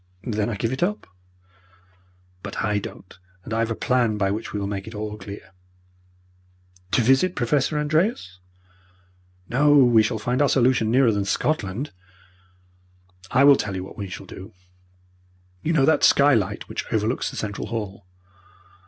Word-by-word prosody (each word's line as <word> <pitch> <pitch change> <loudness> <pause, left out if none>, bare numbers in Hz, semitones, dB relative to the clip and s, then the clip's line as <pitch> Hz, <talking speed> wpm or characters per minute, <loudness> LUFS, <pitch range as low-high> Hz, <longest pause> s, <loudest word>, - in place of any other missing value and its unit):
"Then 105 -3 -1
I 115 - -3
give 115 +4 -2
it 130 - -5
up." 205 +4 -1 1.4
"But 100 0 -5
I 105 0 +1
don't 95 -2 -11 0.2
and 110 - -6
I 115 - 0
have 115 0 0
a 115 - -2
plan 120 -4 +1
by 95 -1 +1
which 110 +3 -4
we 105 - -3
will 100 - -3
make 100 0 -5
it 110 - -8
all 105 0 -4
clear." 100 -1 -10 1.4
"To 120 - +3
visit 135 +10 +3
Professor 135 +5 0
Andreas?" 150 - 0 1.1
"No, 145 +4 +3
we 120 -5 +6
shall 110 +1 -1
find 125 +5 -1
our 145 - +3
solution 125 -4 +2
nearer 125 0 +4
than 100 -2 -1
Scotland. 110 +2 -1 1.4
I 130 +2 +3
will 140 0 +8
tell 100 -3 -3
you 95 - -4
what 95 - -11
we 100 -2 -6
shall 90 +2 -8
do. 95 +3 -11 1.1
You 160 - -1
know 145 -5 +3
that 160 - +3
skylight 115 -9 +3
which - - -6
overlooks 110 +3 0
the - - -10
central 105 -1 -4
hall? 100 -4 -6
110 Hz, 160 wpm, -23 LUFS, 100-135 Hz, 1.4 s, will